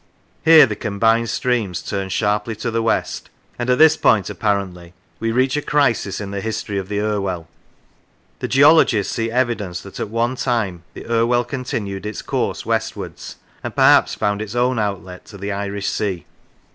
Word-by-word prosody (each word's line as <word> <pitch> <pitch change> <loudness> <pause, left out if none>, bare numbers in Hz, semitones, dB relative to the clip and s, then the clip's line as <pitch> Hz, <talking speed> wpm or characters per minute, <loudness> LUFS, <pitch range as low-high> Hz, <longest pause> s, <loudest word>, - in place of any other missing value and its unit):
Here 160 -2 +8
the 110 -4 -4
combined 115 +3 +1
streams 110 -9 -1
turn 95 -2 -3
sharply 105 +2 0
to 115 +2 -3
the 115 0 0
west, 115 - -1 0.3
and 120 +1 -2
at 125 - +3
this 160 +1 +6
point 105 -10 +2
apparently 95 -4 -2 0.2
we 115 0 -1
reach 130 +3 +1
a 150 - 0
crisis 140 -10 +1
in 100 -1 -6
the 100 -1 -4
history 105 -2 -3
of 95 0 -7
the 105 0 -1
Irwell. 100 -5 -2 0.9
The - - -3
geologists 135 -7 +4
see 115 0 -1
evidence 115 -7 -1
that 100 - -10
at - - -3
one 120 +3 -1
time 110 -10 -1
the - - -9
Irwell 120 +1 +2
continued 110 -6 -4
its 105 - -6
course - - -2
westwards, - - -4 0.3
and - - -5
perhaps - - +5
found 105 0 -1
its 110 +1 -6
own 125 0 +1
outlet 95 -3 -4
to 100 - -12
the 100 +1 -4
Irish 100 0 -3
Sea. 95 -5 -2
110 Hz, 170 wpm, -20 LUFS, 100-120 Hz, 0.9 s, Here